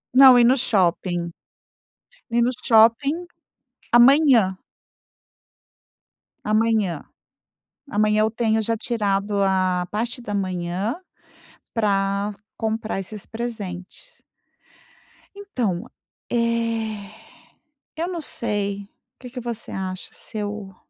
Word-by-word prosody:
Não, 260 Hz, -2 st, +9 dB
ir -, -, +6 dB
no 255 Hz, +2 st, +5 dB
shopping 175 Hz, -6 st, 0 dB, 1.0 s
ir 235 Hz, 0 st, +3 dB
no 245 Hz, +2 st, +3 dB, 0.2 s
shopping 245 Hz, +9 st, +4 dB, 0.7 s
amanhã. 240 Hz, -6 st, +6 dB, 1.9 s
Amanhã. 215 Hz, -6 st, +1 dB, 0.9 s
Amanhã 215 Hz, 0 st, +2 dB
eu 220 Hz, -, +2 dB
tenho 220 Hz, -1 st, +1 dB
já 225 Hz, +1 st, -1 dB
tirado 205 Hz, -3 st, 0 dB
a 185 Hz, -2 st, +1 dB
parte 230 Hz, +4 st, -2 dB
da 205 Hz, -3 st, -5 dB
manhã 185 Hz, -, -2 dB, 0.8 s
pra 200 Hz, -1 st, 0 dB, 0.2 s
comprar 220 Hz, -2 st, -2 dB
esses 205 Hz, +1 st, -7 dB
presentes. 220 Hz, -, -7 dB, 1.1 s
Então, 245 Hz, -, -3 dB, 0.4 s
eh, 230 Hz, -3 st, -1 dB, 0.8 s
eu 335 Hz, +2 st, -2 dB
não 345 Hz, -3 st, -4 dB
sei 200 Hz, -6 st, -2 dB
o -, -, -18 dB, 0.3 s
que 250 Hz, -, -9 dB
que 250 Hz, 0 st, -7 dB
você 235 Hz, -2 st, -5 dB
acha? 185 Hz, -1 st, -5 dB
Se 220 Hz, -, -9 dB
eu 205 Hz, -2 st, -5 dB
215 Hz, 100 wpm, -23 LUFS, 195-235 Hz, 1.9 s, Não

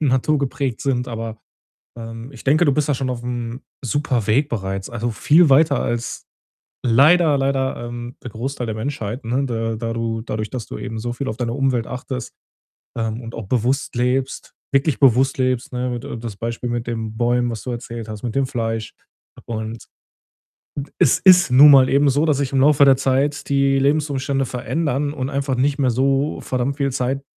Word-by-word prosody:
naturgeprägt 140 Hz, -2 st, 0 dB
sind, 125 Hz, -2 st, -1 dB
aber, 115 Hz, -1 st, -5 dB, 0.6 s
ähm, 115 Hz, +3 st, -8 dB
ich 125 Hz, -, -13 dB
denke, 155 Hz, +5 st, +4 dB
du 145 Hz, -, +3 dB
bist 150 Hz, +1 st, 0 dB
da 145 Hz, -, +2 dB
schon 130 Hz, 0 st, -2 dB
auf'm 120 Hz, 0 st, -4 dB, 0.2 s
Superweg 125 Hz, 0 st, +1 dB
bereits, 95 Hz, -4 st, -4 dB
also 120 Hz, 0 st, -2 dB
viel 150 Hz, +8 st, +4 dB
weiter 145 Hz, +1 st, +4 dB
als, 120 Hz, 0 st, -3 dB, 0.6 s
leider, 145 Hz, +6 st, +5 dB
leider, 135 Hz, -2 st, -1 dB
ähm, 120 Hz, +1 st, -7 dB
der 120 Hz, -, -6 dB
Großteil 120 Hz, +2 st, -4 dB
der 110 Hz, -, -3 dB
Menschheit, 115 Hz, 0 st, -4 dB
ne, 130 Hz, +4 st, 0 dB
da 115 Hz, -2 st, -2 dB
da 115 Hz, +1 st, -3 dB
du 115 Hz, -1 st, -2 dB
dadurch, 110 Hz, -1 st, -4 dB
dass 125 Hz, -4 st, -5 dB
du -, -, -7 dB
eben 115 Hz, -3 st, -5 dB
so 120 Hz, +2 st, -3 dB
viel 135 Hz, +3 st, -4 dB
auf 110 Hz, -, -3 dB
deine 120 Hz, -2 st, -2 dB
Umwelt 130 Hz, -4 st, 0 dB
achtest, 125 Hz, -1 st, -6 dB, 0.6 s
ähm, 115 Hz, 0 st, -2 dB
und 115 Hz, -1 st, -8 dB
auch 115 Hz, -3 st, -6 dB
bewusst 125 Hz, +4 st, 0 dB
lebst, 125 Hz, +2 st, -1 dB, 0.2 s
wirklich 140 Hz, -2 st, +2 dB
bewusst 135 Hz, 0 st, +4 dB
lebst, 130 Hz, -2 st, 0 dB
ne, 125 Hz, 0 st, -2 dB
mit 120 Hz, 0 st, -5 dB
d 125 Hz, -, -6 dB
das 115 Hz, -2 st, -6 dB
Beispiel 115 Hz, +2 st, -4 dB
mit 120 Hz, 0 st, -3 dB
den 110 Hz, -2 st, -4 dB
Bäumen, 120 Hz, +1 st, +1 dB
was 115 Hz, -, -6 dB
du -, -, -6 dB
erzählt 115 Hz, -2 st, -6 dB
hast, 105 Hz, -1 st, -7 dB
mit 120 Hz, -3 st, -3 dB
dem 135 Hz, -1 st, +1 dB
Fleisch. 115 Hz, -3 st, -3 dB, 0.5 s
Und, 110 Hz, 0 st, -5 dB, 0.9 s
hm, 140 Hz, -, -3 dB
es 125 Hz, -, +4 dB
ist 180 Hz, -3 st, +6 dB
nun 140 Hz, +4 st, +8 dB
mal 130 Hz, -2 st, +7 dB
eben 140 Hz, +1 st, +3 dB
so, 145 Hz, +3 st, +2 dB
dass 155 Hz, -3 st, +2 dB
sich 140 Hz, -1 st, -2 dB
im 135 Hz, -, +2 dB
Laufe 145 Hz, 0 st, +5 dB
der 135 Hz, -1 st, +6 dB
Zeit 135 Hz, +2 st, 0 dB
die 140 Hz, -1 st, +2 dB
Lebensumstände 140 Hz, -1 st, 0 dB
verändern 145 Hz, +3 st, -2 dB
und 130 Hz, -3 st, -3 dB
einfach 140 Hz, -2 st, -1 dB
nicht 140 Hz, +3 st, +1 dB
mehr 135 Hz, -3 st, +2 dB
so 135 Hz, +4 st, +1 dB
verdammt 130 Hz, +2 st, -2 dB
viel 140 Hz, -1 st, 0 dB
Zeit 130 Hz, +2 st, -1 dB
b -, -, -34 dB
125 Hz, 190 wpm, -20 LUFS, 115-140 Hz, 0.9 s, nun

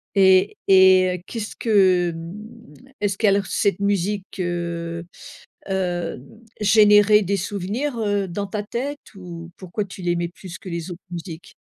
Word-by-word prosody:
Et 190 Hz, 0 st, +4 dB
et 190 Hz, -1 st, +6 dB
heu, -, -, -21 dB
qu'est-ce 220 Hz, -2 st, -5 dB
que, 185 Hz, -5 st, +3 dB
hem 210 Hz, +8 st, -10 dB, 0.3 s
est-ce 200 Hz, -2 st, 0 dB
que 220 Hz, -, +2 dB
alors 200 Hz, 0 st, +3 dB
cette 200 Hz, -1 st, 0 dB
musique, 200 Hz, 0 st, -1 dB
heu 170 Hz, -1 st, -3 dB, 0.6 s
heu, 175 Hz, -5 st, -2 dB, 0.4 s
générait 210 Hz, 0 st, +6 dB
des 200 Hz, +1 st, -1 dB
souvenirs, 205 Hz, +8 st, -3 dB
heu, 205 Hz, -2 st, 0 dB
dans 200 Hz, +3 st, -4 dB
ta 210 Hz, +1 st, -4 dB
tête? 270 Hz, +7 st, -4 dB, 0.2 s
Ou 170 Hz, -3 st, -9 dB
pourquoi 190 Hz, +3 st, -4 dB
tu 190 Hz, 0 st, -11 dB
l'aimais 175 Hz, -1 st, 0 dB
plus 180 Hz, 0 st, -10 dB
que 185 Hz, -, -10 dB
les 170 Hz, +1 st, -5 dB
autres 175 Hz, +1 st, -9 dB
musiques? 170 Hz, -1 st, -8 dB
190 Hz, 150 wpm, -22 LUFS, 175-205 Hz, 0.6 s, et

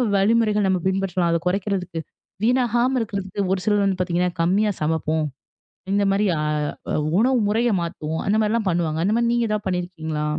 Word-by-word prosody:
வழிமுறைகள்? 210 Hz, 0 st, +3 dB
நம்ம 185 Hz, -2 st, +1 dB
பின்பற்றலாம். 190 Hz, -3 st, 0 dB
அத 170 Hz, -, +2 dB
குறைக்கிறதுக்கு, 185 Hz, -3 st, -1 dB, 0.4 s
வீணாகாம 245 Hz, +1 st, +2 dB
இருக்குறதுக்கு 200 Hz, -2 st, -3 dB
ஒரு 185 Hz, -, -2 dB
சிலர் 205 Hz, -1 st, +2 dB
வந்து 195 Hz, -2 st, 0 dB
பார்த்தீங்கன்னா 180 Hz, 0 st, 0 dB
கம்மியா 200 Hz, +5 st, +2 dB
சமைப்போம். 160 Hz, 0 st, 0 dB, 0.7 s
இந்த 200 Hz, 0 st, +2 dB
மாதிரி 200 Hz, +2 st, +2 dB
அ, -, -, -1 dB, 0.5 s
அ -, -, -1 dB, 0.3 s
உணவு 255 Hz, +3 st, +3 dB
முறைய 230 Hz, +3 st, +2 dB
மாத்துவோம். 160 Hz, -1 st, -4 dB
அந்தமாரில்லாம் 215 Hz, 0 st, +1 dB
பண்ணுவாங்க. 165 Hz, -3 st, 0 dB
அந்தமாரி 235 Hz, +4 st, +2 dB
நீங்க 235 Hz, -1 st, +1 dB
எதாவது 210 Hz, -1 st, -2 dB
பண்ணி 180 Hz, -1 st, 0 dB
இருக்கீங்களா? 160 Hz, -4 st, -4 dB
195 Hz, 155 wpm, -22 LUFS, 175-215 Hz, 0.7 s, வழிமுறைகள்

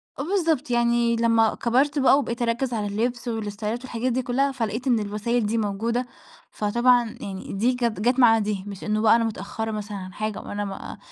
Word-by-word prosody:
آه 275 Hz, -, -4 dB
بالضبط، 320 Hz, -7 st, 0 dB
يعني 235 Hz, 0 st, +2 dB
لما 230 Hz, -1 st, +3 dB
كبَرت 275 Hz, +5 st, +1 dB
بقى 270 Hz, +1 st, +5 dB
وبقِيت 235 Hz, -4 st, -3 dB
أركّز 240 Hz, +2 st, 0 dB
على 210 Hz, -2 st, -1 dB
اللبس 240 Hz, +4 st, -2 dB
والاستايلات 220 Hz, 0 st, -3 dB
والحاجات 255 Hz, 0 st, -2 dB
دي 255 Hz, +2 st, 0 dB
كلّها 270 Hz, +3 st, +1 dB
فلقِيت 235 Hz, 0 st, -3 dB
إن 240 Hz, -3 st, +3 dB
الوسايل 210 Hz, +3 st, -1 dB
دي 225 Hz, +2 st, 0 dB
موجودة، 225 Hz, +4 st, -1 dB, 0.4 s
فطبعًا 240 Hz, +2 st, +2 dB
يعني 195 Hz, -1 st, -6 dB
دي 235 Hz, +6 st, +2 dB
كات 235 Hz, -5 st, -1 dB
جات 245 Hz, +5 st, +2 dB
مع 225 Hz, -3 st, +6 dB
دي، 205 Hz, -2 st, -2 dB
مش 200 Hz, -2 st, -8 dB
إنّه 215 Hz, 0 st, 0 dB
بقى 220 Hz, 0 st, +6 dB
أنا 230 Hz, -, +2 dB
متأخّرة 220 Hz, 0 st, -4 dB
مثلًا 210 Hz, -1 st, -5 dB
عن 185 Hz, -1 st, -8 dB
حاجة 215 Hz, +1 st, -3 dB
وأنا 205 Hz, 0 st, -4 dB
م 195 Hz, -1 st, -7 dB
230 Hz, 195 wpm, -24 LUFS, 210-245 Hz, 0.4 s, مع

